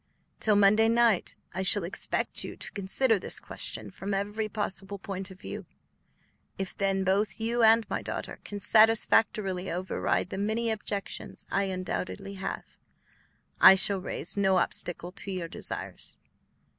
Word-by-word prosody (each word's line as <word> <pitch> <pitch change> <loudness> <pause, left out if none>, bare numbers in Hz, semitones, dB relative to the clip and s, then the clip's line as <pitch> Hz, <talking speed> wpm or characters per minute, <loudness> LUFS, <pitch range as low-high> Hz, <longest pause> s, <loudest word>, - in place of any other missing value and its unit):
Till 215 -2 +3
Monday 210 +2 +5
night 230 -4 +2 0.2
I 185 - -2
shall 190 +1 +5
expect 170 - -2
you - - -7
to - - -6
consider 210 +3 +2
this - - -2
question - - -5
from 195 +1 -4
every 205 +2 -2
possible 200 -1 -4
point 195 0 -5
of 190 -1 -13
view. - - -7 0.9
If 195 -1 -4
then 195 -1 0
both 195 +2 0
you 235 +2 0
and 225 0 +5
my - - -3
daughter - - -5
can 205 - -6
satisfactorily 215 -3 +3
override 180 0 -1
the 190 - -4
many 220 +3 0
objections 210 -2 -4
I 200 0 +1
undoubtedly 190 +1 -4
have, 195 - -4 0.9
I 190 - +10
shall 190 0 +3
raise - - -4
no 195 -2 +3
obstacle 175 0 -1
to 195 - -7
your 180 -3 -3
desires. - - -6
200 Hz, 145 wpm, -28 LUFS, 190-215 Hz, 0.9 s, I